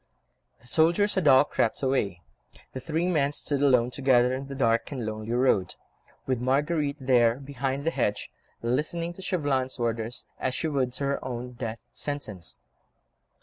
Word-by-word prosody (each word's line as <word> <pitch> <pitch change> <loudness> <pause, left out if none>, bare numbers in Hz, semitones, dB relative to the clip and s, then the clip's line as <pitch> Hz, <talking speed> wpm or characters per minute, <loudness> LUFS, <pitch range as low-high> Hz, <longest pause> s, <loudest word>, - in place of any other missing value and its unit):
The 115 - -18
soldiers 170 +10 +3
had 185 -5 +1
all 135 0 +8
crept 120 -3 -1
away; 100 -10 0 0.5
the 130 - -4
three 160 +5 -1
men 145 -6 +2
stood 145 -1 -1
alone 125 -4 +4
together 125 -2 +3
in 135 +1 -4
the 140 - -6
dark 115 -2 +1
and 130 -5 -4
lonely 110 +1 -4
road, 120 -7 +2 0.5
with 130 -3 -1
Marguerite 145 +3 +1
there, 120 -3 +4
behind 135 +1 -4
the 165 - +2
hedge, 105 - -1 0.3
listening 155 +8 -1
to 190 - -11
Chauvelin's 145 -8 -1
orders, 115 0 -2
as 130 0 -1
she 160 - -1
would 135 -5 0
to 130 - -4
her 140 0 -1
own 125 -1 -5
death 115 -2 -5 0.2
sentence. 110 - -5
130 Hz, 160 wpm, -27 LUFS, 120-145 Hz, 0.5 s, all